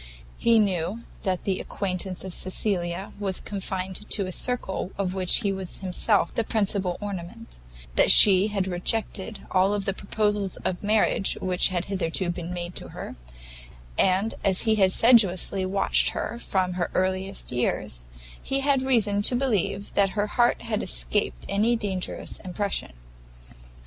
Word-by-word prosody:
He 230 -1 +4
knew 195 +1 0 0.2
that 185 -3 -2
the 190 -2 -1
acquaintance 185 -1 -3
of 190 -2 -7
Cecilia 185 -1 -1
was 195 -3 -1
confined 190 0 -5
to 200 - +2
a 185 - -5
circle 195 -4 -2
of 190 -2 -2
which 185 +3 +3
he 200 -3 0
was 190 -2 -4
himself 195 +2 +1
the 230 - 0
principal 200 -4 -1
ornament, 205 - -7 0.4
that - - +5
she 195 -1 +8
had 200 -3 -1
rejected 190 +3 -3
all 195 +2 +2
the 195 -1 -2
proposals 205 -1 -2
of 180 - -2
marriage 210 -2 +1
which 180 -1 +3
had 180 -2 -2
hitherto 185 -2 -1
been 175 0 -6
made 175 0 -5
to - - -1
her, - - -8 0.8
and, 195 +4 +2
as 195 -2 +4
he 220 -1 +2
had 195 -3 +3
sedulously 195 -4 +4
watched 195 +1 +3
her 235 - -4
from 185 -5 -1
her 180 -1 -2
earliest 190 -1 -1
years, - - -2 0.4
he 270 0 -1
had 275 -1 +2
reason 220 -6 +2
to 245 - +4
believe 210 -6 -1
that 200 -1 +3
her 205 - +2
heart 240 +3 +1
had 225 -2 -2
escaped - - -1
any 220 +4 +1
dangerous 195 -5 -4
impression. 190 - -3
195 Hz, 150 wpm, -25 LUFS, 185-210 Hz, 0.8 s, she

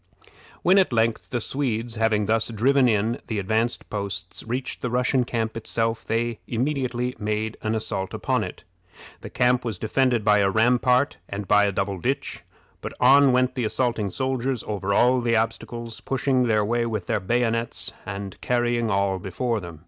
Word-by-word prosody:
When 185 +3 +5
at 190 - +2
length 115 -1 0
the 120 - -1
Swedes, 120 -2 -2
having 110 -2 +2
thus 110 +1 +1
driven 125 +4 +3
in 110 +2 +1
the 110 - -2
advanced 110 +4 -1
posts, 100 -3 -5
reached 125 +3 -4
the 125 - -2
Russian 125 +1 +1
camp 115 -2 -2
itself, 115 0 -2
they 115 0 -1
immediately 125 -1 -1
made 110 +1 -2
an 110 +1 -1
assault 95 -3 -3
upon - - -1
it. - - -8 0.6
The - - -9
camp 125 0 +2
was 115 -5 -3
defended 120 +1 +1
by 105 -1 +5
a 100 -1 +3
rampart 125 +5 +3
and 100 0 -5
by 105 0 +5
a 100 - +1
double 95 0 -2
ditch, 130 +8 -2 0.4
but - - -6
on 135 +2 +6
went 125 0 +2
the 125 -2 -2
assaulting 115 -2 0
soldiers 130 +2 -2
over 100 -2 -3
all 125 +5 +4
the 115 -1 +1
obstacles, 115 +1 -3
pushing 130 -2 +1
their 105 -2 +2
way 120 +2 0
with 110 -5 -3
their - - 0
bayonets, 115 +3 -1
and 100 -1 -7
carrying 120 -1 +1
all 100 -1 +1
before 110 +6 -2
them. 85 -4 -9
115 Hz, 170 wpm, -24 LUFS, 105-125 Hz, 0.6 s, on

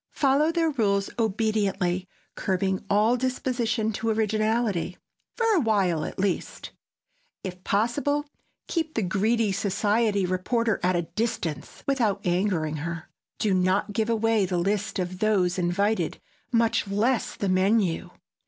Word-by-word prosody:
Follow 285 +3 +3
their 330 -1 +1
rules 200 -7 +1
obediently, 200 -4 0 0.3
curbing 190 0 -1
all 210 +4 +4
disposition 240 -3 -1
to 225 +2 -2
originality—for 215 - -1
a - - +4
while, 195 - +1
at - - -7
least. 195 -2 -2 0.7
If 180 -1 -7
possible, 285 +9 0 0.4
keep 320 -2 -2
the 225 - +1
greedy 215 +3 +1
society 205 +1 +1
reporter 215 +5 0
at 180 +1 +2
a 175 - +1
distance, 175 -5 -4
without 230 -8 +1
angering 175 -4 0
her. 165 +2 -5 0.3
Do 210 -3 +1
not 185 +3 +1
give 220 +2 0
away 225 -3 +2
the 180 -1 -1
list 200 +5 -1
of 180 0 -3
those 190 -4 +2
invited, 200 +5 0 0.3
much 230 -2 +2
less 220 +5 0
the 200 - -2
menu. 185 -1 +2
205 Hz, 125 wpm, -26 LUFS, 185-230 Hz, 0.7 s, all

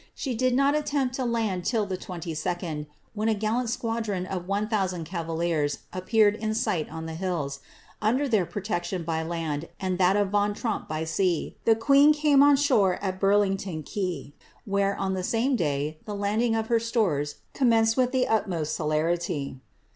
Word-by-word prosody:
She 265 - -3
did 255 +2 +1
not 275 +2 +3
attempt 290 -4 0
to 260 - -1
land 220 -6 -1
till 220 +2 +1
the 190 -2 -3
22d, 165 -3 -4 0.3
when 215 +1 0
a 220 - +2
gallant 225 +4 -1
squadron 225 -5 -2
of 180 -1 -5
one 200 +2 0
thoosand 190 -6 -1
cavaliers 165 -3 -1 0.2
appeared 205 +3 +3
in 215 0 -2
sight 165 -7 0
on 160 0 -6
the 160 - -5
hills; 160 -6 -3 0.4
under 250 +7 +2
their 210 -8 +2
protection 180 -3 -3
by 160 -1 -1
land, 160 -2 -3
and 185 -1 -2
that 185 +1 +4
of 205 -1 +2
Van 205 0 +1
Tromp 220 -1 -3
by 155 +1 -2
sea, 165 +1 0
the 225 - +5
queen 280 +6 +5
came 295 -2 +4
on 285 0 +7
shore 240 -10 +3
at 190 -2 -4
Burlington 195 -4 +1
quay, 180 -5 -4 0.3
where, 200 0 +1
on 190 0 -1
the 190 - -2
same 235 +8 +1
day, 150 - -1
the 210 - -5
landing 215 +3 +1
of 225 0 0
her 230 0 +2
stores 195 - 0 0.2
commenced 225 -4 +3
with 255 -1 +2
the 260 -1 +1
utmost 175 -8 0
celerity. 155 -2 -1
195 Hz, 175 wpm, -26 LUFS, 170-225 Hz, 0.4 s, on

